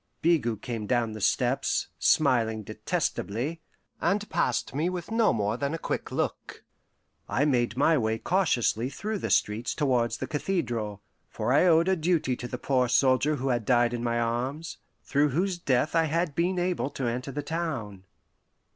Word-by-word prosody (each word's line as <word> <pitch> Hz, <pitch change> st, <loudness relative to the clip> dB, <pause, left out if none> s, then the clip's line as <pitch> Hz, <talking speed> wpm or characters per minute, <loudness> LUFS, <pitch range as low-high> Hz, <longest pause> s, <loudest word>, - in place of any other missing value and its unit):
Bigot 120 Hz, -, +1 dB
came 115 Hz, -4 st, -4 dB
down 120 Hz, -2 st, +1 dB
the 110 Hz, -1 st, -7 dB
steps, -, -, +1 dB
smiling 110 Hz, -3 st, +2 dB
detestably, 125 Hz, +10 st, -3 dB, 0.4 s
and 210 Hz, +1 st, 0 dB
passed 125 Hz, -2 st, 0 dB
me 155 Hz, +6 st, 0 dB
with 180 Hz, +2 st, -5 dB
no 225 Hz, -1 st, +3 dB
more 105 Hz, 0 st, -1 dB
than 140 Hz, +4 st, -2 dB
a -, -, -3 dB
quick -, -, -4 dB
look. -, -, -3 dB, 0.7 s
I 140 Hz, -, +1 dB
made 125 Hz, -4 st, +1 dB
my 155 Hz, +2 st, +4 dB
way 110 Hz, -1 st, 0 dB
cautiously 125 Hz, -, +1 dB
through 210 Hz, +8 st, -4 dB
the -, -, -3 dB
streets 110 Hz, +3 st, +1 dB
towards 120 Hz, -5 st, +1 dB
the -, -, -3 dB
cathedral, 120 Hz, -, -2 dB, 0.3 s
for 125 Hz, -, -1 dB
I 165 Hz, +6 st, +5 dB
owed 165 Hz, 0 st, +5 dB
a 190 Hz, -, +3 dB
duty 165 Hz, -6 st, +1 dB
to 120 Hz, -, -6 dB
the 125 Hz, -, -5 dB
poor 125 Hz, -1 st, +1 dB
soldier 135 Hz, +4 st, +3 dB
who 135 Hz, -1 st, -2 dB
had 120 Hz, -2 st, 0 dB
died 120 Hz, +1 st, +3 dB
in 120 Hz, -1 st, -3 dB
my 120 Hz, 0 st, 0 dB
arms, 125 Hz, +7 st, -2 dB, 0.2 s
through 145 Hz, +1 st, +2 dB
whose 175 Hz, +6 st, -1 dB
death 140 Hz, 0 st, +1 dB
I 165 Hz, -1 st, +4 dB
had 165 Hz, 0 st, 0 dB
been 175 Hz, +5 st, 0 dB
able 180 Hz, -5 st, 0 dB
to 135 Hz, -2 st, -4 dB
enter 125 Hz, +3 st, -2 dB
the 145 Hz, +2 st, -4 dB
town. 135 Hz, -, -4 dB
130 Hz, 175 wpm, -27 LUFS, 120-165 Hz, 0.7 s, I